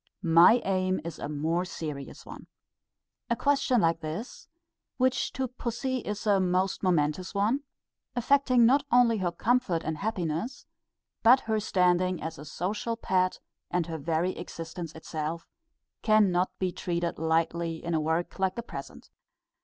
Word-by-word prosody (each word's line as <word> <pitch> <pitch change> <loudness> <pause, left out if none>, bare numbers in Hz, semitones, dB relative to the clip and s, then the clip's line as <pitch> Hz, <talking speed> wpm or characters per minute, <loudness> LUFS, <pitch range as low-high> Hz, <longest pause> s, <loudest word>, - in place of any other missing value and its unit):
My 180 +9 +7
aim 185 -1 +1
is 170 - -6
a 145 - -4
more 160 +4 0
serious 150 -6 -7
one. - - -11 0.8
A 235 - +2
question 275 -3 +2
like 165 0 +2
this, 160 +9 -6 0.5
which 255 0 +1
to 265 0 -2
pussy 250 +1 -3
is 210 -2 -5
a 205 -2 +4
most 185 +1 0
momentous 180 +1 0
one, 215 +7 +2 0.6
affecting 255 -1 +4
not 275 +4 +4
only 240 -3 +5
her 180 -2 0
comfort 210 -2 +1
and 155 0 -3
happiness, 185 - -3 0.6
but 250 +4 +6
her 220 -1 0
standing 180 -3 +2
as 160 -2 -6
a 150 - -9
social 210 +8 -3
pet 185 -4 0 0.3
and 175 -1 0
her 165 -1 -5
very 165 +4 0
existence 165 0 -7
itself, 160 +1 -5 0.5
cannot 195 -5 +3
be 185 -1 -1
treated 170 -2 -3
lightly 165 +1 0
in 170 - -1
a 160 - +1
work 160 +4 -1
like 190 -1 +1
the 235 - -4
present. - - -9
185 Hz, 145 wpm, -28 LUFS, 165-225 Hz, 0.8 s, My